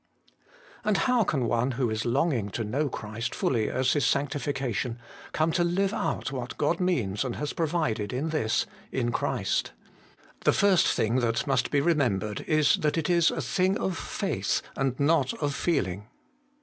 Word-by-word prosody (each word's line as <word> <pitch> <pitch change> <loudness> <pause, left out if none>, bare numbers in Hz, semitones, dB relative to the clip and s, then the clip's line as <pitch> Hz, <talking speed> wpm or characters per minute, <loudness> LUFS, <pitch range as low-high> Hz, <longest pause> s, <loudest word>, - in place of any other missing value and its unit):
And 215 -3 +2
how 250 -3 +3
can 135 -9 0
one 120 +3 +1
who 120 -2 0
is 110 0 -2
longing 120 -4 +1
to 115 - -1
know 140 +8 -1
Christ 110 0 -5
fully 115 -4 0
as 130 0 +1
his 145 - +1
sanctification, 135 -2 -1 0.3
come 155 +1 +1
to 175 +1 +2
live 190 +4 +1
out - - -2
what 125 -2 -5
God 160 +3 +1
means 125 - 0
and 125 -3 -3
has 150 0 -3
provided 155 -11 -1
in 135 +6 -2
this 150 -9 +1
' - - -22
in 120 -2 0
Christ - - -1 0.3
'? - - -26
The - - +4
first 195 -3 +4
thing 115 +3 +1
that 120 -2 0
must 135 -2 +1
be 145 - +2
remembered 120 - +1
is 155 -2 +4
that 150 +1 0
it 165 +2 0
is 170 -1 +4
a 160 - -3
thing 185 +9 +1
of 190 - -2
faith - - -2
and 135 -2 -1
not 140 -2 +2
of 145 -2 -2
feeling. 105 - -1
140 Hz, 175 wpm, -27 LUFS, 120-160 Hz, 0.3 s, The